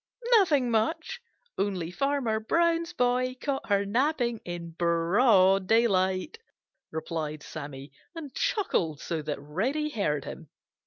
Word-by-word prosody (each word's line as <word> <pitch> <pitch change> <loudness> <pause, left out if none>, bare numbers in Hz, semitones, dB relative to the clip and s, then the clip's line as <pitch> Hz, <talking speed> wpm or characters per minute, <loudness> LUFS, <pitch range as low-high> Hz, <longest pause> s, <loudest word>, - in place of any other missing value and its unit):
"Nothing 290 -10 +2
much, 315 - -1 0.4
only 190 -4 -1
Farmer 275 -1 0
Brown's 335 +7 +1
boy 250 +1 +1
caught 275 -3 -3
her 200 0 +2
napping 240 +1 0
in 175 -1 -6
broad 185 +3 +3
daylight," 200 - +2 0.5
replied 155 -1 -4
Sammy, 140 -3 -8 0.2
and 300 -5 -8
chuckled 345 - 0
so 165 -2 -3
that 150 -1 -4
Reddy 230 - -2
heard 150 - -1
him. - - -9
210 Hz, 115 wpm, -28 LUFS, 170-275 Hz, 0.5 s, broad